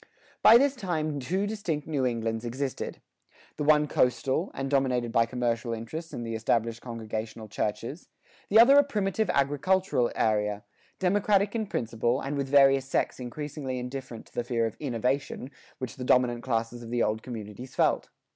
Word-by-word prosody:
By 225 - +9
this 280 +2 +2
time 155 - -2
two 185 +10 -1
distinct 190 -9 -3
New 140 -5 0
Englands 115 -1 -2
existed 130 +3 -4 0.6
the - - -2
one 150 0 +4
coastal, 130 +7 +1
and 135 - -3
dominated 130 -4 +1
by 115 0 +3
commercial 120 -1 -1
interests 115 +9 -6
and 120 - -5
the 115 - -4
established 115 +1 0
congregational 110 -2 -5
churches; 115 - -4 0.4
the 220 - +6
other 270 +5 +8
a - - +6
primitive 210 -5 -1
agricultural 145 -1 +1
area, 105 -1 0 0.3
democratic 200 +1 +2
in 220 -3 -2
principle, 120 - -1
and 140 +1 -3
with 140 -1 -2
various 135 -1 +5
sects 135 - -1
increasingly 135 +1 -5
indifferent 125 -2 -6
to - - -23
the 120 - -1
fear 120 -1 0
of 110 - -3
"innovation" 130 0 -2 0.3
which 130 -3 -6
the 130 - -5
dominant 125 -1 +3
classes 115 -1 -2
of 115 - -9
the 120 0 +1
old 110 +1 0
communities 120 +1 -8
felt. - - +2
130 Hz, 165 wpm, -28 LUFS, 115-155 Hz, 0.6 s, By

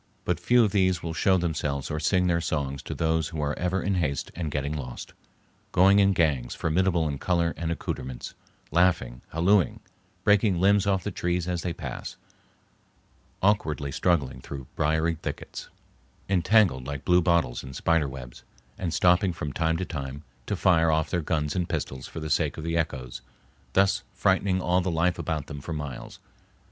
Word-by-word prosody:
But 90 -2 0
few 120 +7 +4
of 105 - +1
these 95 -3 +2
will 85 -1 -3
show 95 +3 +3
themselves 75 -5 -2
or 75 - -2
sing 90 +4 +2
their 85 -1 +2
songs 70 -4 -2
to - - -6
those 80 -1 +1
who 80 - -6
are 75 0 0
ever 90 +1 0
in 100 - 0
haste 75 -7 -1
and 80 -3 -3
getting 70 +1 -2
lost, 65 -5 -7 0.6
going 95 +3 +5
in 100 -1 +4
gangs 70 -9 +1
formidable 85 0 +1
in 70 -2 -3
color 85 -2 +1
and 85 0 -3
accoutrements, 65 -6 -5 0.4
laughing, 80 -8 +2
hallooing, 85 -1 +2 0.4
breaking 105 -3 +3
limbs 100 +2 +4
off 95 -2 +1
the 105 - -3
trees 90 -1 -1
as 90 -2 -1
they 90 - -2
pass, - - -6 1.3
awkwardly 80 -9 +1
struggling 70 -5 0
through 65 -1 -7
briery 80 +2 +1
thickets, - - -6 0.6
entangled 95 - +3
like 70 -1 -5
blue 90 0 +5
bottles 85 -8 +1
in 65 - -8
spider 85 +2 +1
webs, 60 -2 -10 0.4
and 85 -3 -2
stopping 90 +1 +4
from 75 -4 -5
time 80 +3 +1
to 95 - -2
time 70 -3 -6 0.2
to - - 0
fire 85 -2 +3
off 80 0 +1
their 90 - +1
guns 75 -2 -1
and 90 -2 -1
pistols 65 -1 -4
for - - -7
the 80 -1 -4
sake 75 -1 +1
of 80 - -5
the 85 +1 -2
echoes, 65 -6 -3 0.5
thus 95 0 +3
frightening 95 -2 +2
all 90 0 +2
the 90 - -1
life 85 +1 +1
about 80 -4 -2
them 70 -2 -8
for 80 - -5
miles. 75 -5 -6
85 Hz, 175 wpm, -26 LUFS, 75-90 Hz, 1.3 s, going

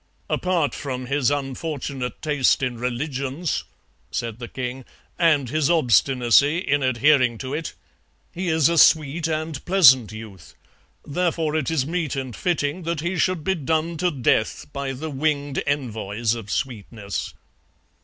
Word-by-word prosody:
"'Apart 175 -5 +1
from 130 -3 -5
his 140 0 +1
unfortunate 140 -2 -4
taste 145 -3 +2
in 120 -2 -2
religions;' 135 +5 -2 0.4
said 115 -1 -4
the 120 - -6
king, 130 +1 -5 0.4
'and 150 -7 +3
his 155 +2 +1
obstinacy 135 -1 +4
in 145 -5 0
adhering 130 -1 +3
to 130 +3 -5
it, 155 +1 -4 0.6
he 180 +1 -4
is 160 -3 +3
a 170 -1 +2
sweet 155 +2 +4
and 155 -2 -3
pleasant 130 - +6
youth, 110 -5 -11 0.5
therefore 160 -1 -1
it 155 -4 0
is 155 -5 0
meet 160 -2 -2
and 130 -4 -4
fitting 165 -1 -1
that 165 -2 -2
he 175 +3 -2
should 180 -2 0
be 190 - +1
done 160 +1 -1
to 180 +3 +1
death 125 -7 0
by 140 -1 -3
the 150 +4 -5
winged 145 0 -1
envoys 115 -5 -1
of 115 -4 -7
sweetness.' 105 -5 -4
140 Hz, 145 wpm, -23 LUFS, 125-160 Hz, 0.6 s, pleasant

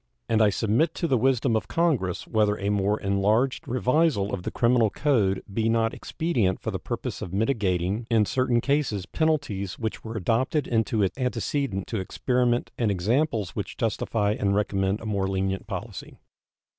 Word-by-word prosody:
And 115 -1 +2
I 105 - +6
submit 115 - +1
to 170 - -1
the 135 - +2
wisdom 125 -1 +2
of 110 - -1
Congress 140 - 0
whether 105 -2 +2
a 100 0 -2
more 105 +1 +1
enlarged 105 +6 +1
revisal 125 -4 +1
of 90 - -2
the - - -3
criminal 120 -2 +3
code 105 -9 +1
be 115 +1 +1
not 115 0 +1
expedient 120 - -1
for - - -4
the - - -3
purpose - - -5
of 85 - -5
mitigating 100 -2 0
in 110 -3 +3
certain 125 0 +1
cases 135 -9 0
penalties 140 - -1
which 110 -2 -4
were 110 0 -5
adopted 125 - +1
into 110 -2 +1
it 95 -1 0
antecedent 125 -4 -1
to 110 - -3
experiment 120 +5 0
and 115 -3 +2
examples 105 - 0
which 100 +1 -5
justify 110 -2 0
and 100 -2 0
recommend 100 0 0
a - - -8
more 100 -3 0
lenient 95 0 -2
policy. - - -7
110 Hz, 170 wpm, -26 LUFS, 100-125 Hz, -, I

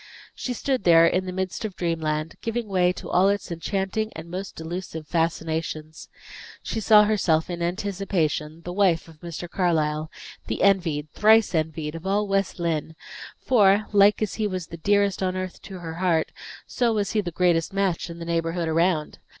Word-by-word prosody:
She 250 - -4
stood 260 -1 -1
there 165 -1 +7
in 185 +2 +1
the - - -3
midst 190 +2 -3
of 210 -4 -4
dreamland, 160 -2 -2
giving 230 0 -3
way 180 -2 +2
to - - -9
all 185 +2 +3
its 200 -3 -2
enchanting 195 +5 -2
and 165 +1 -9
most 190 +2 -5
delusive 160 -1 -6
fascinations. 160 -1 -2 0.5
She 225 - -3
saw 210 -1 +6
herself, 180 -6 +1
in 175 -1 -5
anticipation, 170 -4 -2
the 175 - -5
wife 180 -5 +2
of 160 -2 -16
Mr. 170 0 -6
Carlyle, 155 -4 0 0.4
the - - -2
envied, 165 -7 +2
thrice 220 -1 +4
envied, 155 -1 -2
of 165 +3 -7
all 205 +2 +1
West 195 0 0
Lynne; 160 -2 -2 0.4
for, 205 -4 +4
like 205 +1 +5
as 210 - -2
he 210 - +2
was 185 -3 -4
the 170 - -8
dearest 200 +2 +1
on 185 -1 0
earth 185 -1 -5
to 195 -2 -9
her 165 -2 -6
heart, 170 -2 +1 0.3
so 240 -2 0
was 205 -2 0
he 215 - +1
the 180 - -4
greatest 170 -1 +1
match 195 -3 -1
in 170 - -8
the 170 - -7
neighborhood 165 0 -1
around. 160 -1 0
180 Hz, 180 wpm, -24 LUFS, 165-200 Hz, 0.5 s, there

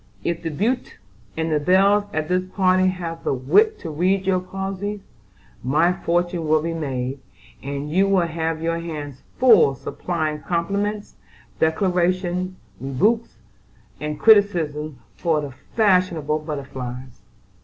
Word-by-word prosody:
"If 170 0 -2
the 165 - -3
beaux 225 - 0 0.6
and 160 -2 0
belles 200 +4 +4
at 155 -3 -2
this 180 +1 +1
party 185 -1 +3
have 170 -3 -4
the - - 0
wit 425 - +3
to 165 - -5
read 185 +5 +1
your 185 -1 +2
posies, 195 +2 -4 0.6
my 155 +8 +3
fortune 175 -1 -1
will 155 0 +3
be 165 0 -2
made, 135 -4 -3 0.4
and 140 +1 -4
you 190 +4 +3
will 190 -3 +3
have 160 -1 -3
your 165 0 0
hands 150 -5 -6 0.2
full 215 - +6
supplying 155 +1 -3
compliments, 200 +5 -2 0.4
declarations, 180 +2 +1 0.2
rebukes, 195 - 0 0.6
and 150 0 -4
criticisms 160 -9 +3 0.2
for 165 -3 +1
the 145 -2 -5 0.2
fashionable 180 -8 +2
butterflies. 130 -4 -7
170 Hz, 125 wpm, -22 LUFS, 150-190 Hz, 0.6 s, full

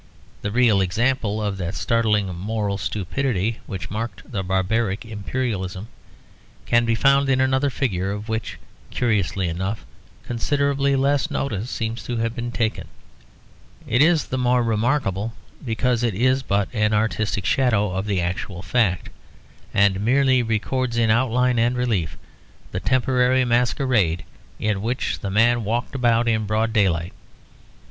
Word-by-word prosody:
The 100 - -2
real 110 -3 +3
example 110 +3 0
of 100 -2 -2
that 95 +1 -4
startling 110 -3 +1
moral 100 +1 -2
stupidity 110 +2 -1
which 95 -4 -6
marked 115 +5 -5
the 100 -5 -2
barbaric 95 +3 0
imperialism 105 -2 -4 0.8
can 120 0 +3
be 115 -1 +2
found 140 +2 +3
in 130 -1 +3
another 130 +2 +2
figure 100 -9 -1
of 105 +2 -5
which, 110 0 -3 0.3
curiously 100 -5 0
enough, 95 +6 -3 0.4
considerably 140 +3 0
less 140 +3 +1
notice 125 -6 -2
seems 115 -1 -3
to 120 - -3
have 115 0 -1
been 120 -1 -4
taken. 115 -2 -2 1.0
It 125 - +2
is 160 0 +4
the 130 - -3
more 125 0 +2
remarkable 115 -2 0 0.3
because 120 0 0
it 115 -5 0
is 130 +5 +2
but 100 -5 0
an 105 -1 +1
artistic 110 -2 0
shadow 110 -7 +2
of 95 +3 -3
the 100 -3 0
actual 90 +1 -4
fact; 95 -3 0 0.6
and 100 -1 +3
merely 130 +3 +3
records 120 +2 -1
in 115 -2 +3
outline 125 +1 +2
and 120 +2 +2
relief 110 - -1 0.5
the 95 - -2
temporary 130 +1 +2
masquerade 120 - +1 0.3
in 105 -2 -1
which 120 +4 -2
the 100 - -4
man 115 +4 +3
walked 115 +6 -2
about 120 -3 +2
in 110 -2 +1
broad 110 +1 0
daylight. 90 -5 +1
115 Hz, 140 wpm, -22 LUFS, 100-125 Hz, 1.0 s, is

